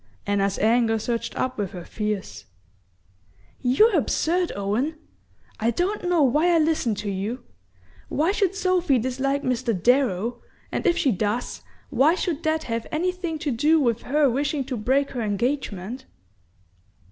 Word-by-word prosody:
Anna's 200 -1 0
anger 225 +1 +3
surged 230 +1 -3
up 255 -3 -2
with 200 -3 -3
her 175 -2 -7
fears. 210 -2 -4 1.2
"You're 370 - +4
absurd, 345 +3 +1
Owen! 215 +10 -1 0.6
I 225 +1 +1
don't 360 - -1
know 340 -4 +4
why 300 +7 +3
I 345 - +4
listen 310 -8 +1
to 205 0 -4
you. 210 +6 -4 0.7
Why 320 +6 +1
should 395 -2 0
Sophy 365 -7 +2
dislike 265 +4 -1
Mr. 235 -5 0
Darrow, 240 0 +1 0.3
and - - -1
if 345 -1 +3
she 275 - +2
does, 215 +4 -2 0.3
why 305 +6 +4
should 340 -4 -2
that 315 0 0
have 230 -3 -3
anything 350 0 -2
to 290 - +1
do 300 +7 +3
with 235 -5 +1
her 290 +3 +2
wishing 280 +3 0
to 260 0 -4
break 265 +6 +1
her 245 - -3
engagement?" 225 +1 -2
260 Hz, 145 wpm, -24 LUFS, 225-315 Hz, 1.2 s, You're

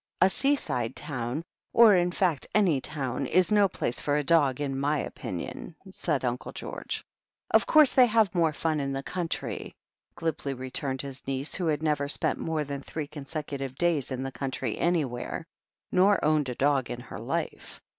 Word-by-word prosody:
"A 185 +2 +5
seaside 140 - +1
town, 130 0 -3 0.3
or, 225 -4 +8
in 175 0 +2
fact, 175 -6 0
any 180 -10 +3
town, 135 -2 -2
is 185 +7 +3
no 205 -1 +5
place 125 -8 -1
for 145 0 0
a 150 - 0
dog, 145 -4 +3
in 135 -2 -2
my 145 +2 +1
opinion," - - -6 0.2
said - - -1
Uncle - - -3
George. - - -5 0.5
"Of - - +4
couree 310 -1 +7
they 255 -2 +7
have 220 -4 +3
more 165 -3 +3
fun 155 0 -1
in 135 -1 -2
the 135 0 -3
country," 175 0 -4 0.4
glibly 150 -4 -2
returned 130 +1 -3
his 135 -2 -9
niece, 135 +2 -1
who 180 -3 +1
had 155 -1 0
never 145 -2 0
spent - - +1
more 160 -2 -1
than 140 -1 -5
three 155 +1 -5
consecutive 140 -2 -6
days 165 -3 +1
in 130 -1 -3
the 135 - -4
country 135 -1 -3
anywhere, 155 -4 -1 0.5
nor 195 0 +4
owned 150 -3 +2
a 125 - -4
dog 135 -2 +1
in 120 - -4
her - - -9
life. - - -4
150 Hz, 175 wpm, -28 LUFS, 135-170 Hz, 0.5 s, or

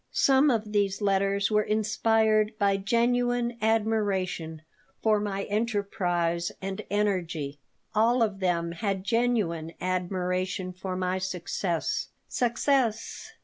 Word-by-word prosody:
Some 275 +2 +4
of 220 -4 0
these 200 -2 +1
letters 200 0 +1
were 210 0 +4
inspired 220 0 +2
by 200 -1 +2
genuine 240 +3 +1
admiration 200 -7 0 0.4
for 215 -1 +4
my 200 -1 -2
enterprise 185 -6 -1
and 190 0 -4
energy. 170 -8 -1 0.3
All 230 +3 +3
of 205 -3 -1
them 170 -3 0
had 195 +1 -2
genuine 200 -8 0
admiration 185 0 -2
for 185 0 -5
my 185 0 -1
success. 180 -2 -2 0.2
Success! 240 -1 0
200 Hz, 105 wpm, -27 LUFS, 185-220 Hz, 0.4 s, Some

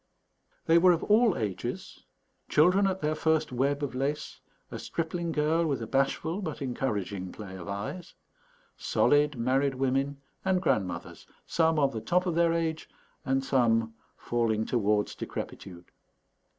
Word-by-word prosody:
They 165 +1 +5
were 180 +1 +6
of 165 - -2
all 215 -1 +4
ages: 100 -4 -5 0.4
children 180 +6 +4
at 190 0 -2
their 150 0 +1
first 160 -1 +1
web 140 +3 0
of 140 - -3
lace, 140 +4 -3 0.3
a - - -5
stripling 170 +1 -3
girl 155 +2 +1
with 140 -3 -1
a 115 - -4
bashful 140 - 0
but 155 -6 -5
encouraging 105 - -3
play 100 -3 -9
of 90 -1 -9
eyes, 100 - -5 0.6
solid 145 0 +2
married 135 +3 +1
women, 135 +2 0 0.2
and 190 -1 +2
grandmothers, 100 - -2 0.2
some 160 -1 +2
on 140 -2 +3
the 110 - -5
top 180 +9 +1
of 180 - 0
their 170 0 +3
age 165 -1 -2 0.4
and 135 0 0
some 115 -4 +2 0.2
falling 115 -2 0
towards 105 -3 +1
decrepitude. 90 -2 -7
140 Hz, 145 wpm, -28 LUFS, 115-165 Hz, 0.6 s, were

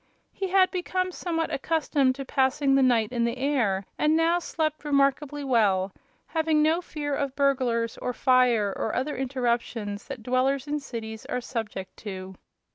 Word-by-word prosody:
He 390 - -3
had 375 0 +4
become 370 0 -1
somewhat 330 -2 -2
accustomed 280 -3 +1
to 275 0 -6
passing 270 +1 +2
the 275 - +5
night 235 -4 +3
in 240 -2 0
the 235 +2 -1
air 245 -9 0
and 305 +1 +3
now 335 +2 +3
slept 310 -3 -2
remarkably 285 0 +1
well, 200 -7 +2 0.3
having 320 -2 +1
no 320 +3 +2
fear 295 -4 -4
of 275 -1 -2
burglars 255 -5 +1
or 250 - -2
fire 245 -5 +3
or 220 - -2
other 290 +3 -1
interruptions 235 -5 -2
that 265 -5 -7
dwellers 255 +2 +1
in 295 0 -2
cities 225 -5 -7
are 250 - -1
subject 220 -6 -5
to. 190 -3 -7
265 Hz, 160 wpm, -26 LUFS, 235-300 Hz, 0.3 s, the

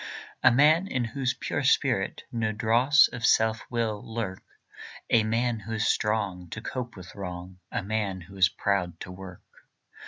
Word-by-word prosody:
A - - +7
man 155 +8 +4
in 130 -9 -1
whose 125 +2 -2
pure - - -3
spirit - - +1
No 110 -2 -1
dross 120 +8 +5
of 125 -2 -8
self 110 0 +3
will 115 -4 -1
lurk; 110 -5 -4 0.7
A 115 -2 +5
man 115 +1 0
who 110 +2 -7
is 110 -1 0
strong 100 -5 -1
to 110 - -6
cope 120 +1 -5
with 95 -1 -11
wrong, 90 -1 -7
A 125 -5 -2
man 100 -2 -2
who 95 +3 -13
is 95 -1 +5
proud 90 -4 -1
to 90 - -7
work. 90 -1 -10
110 Hz, 165 wpm, -27 LUFS, 95-120 Hz, 0.7 s, A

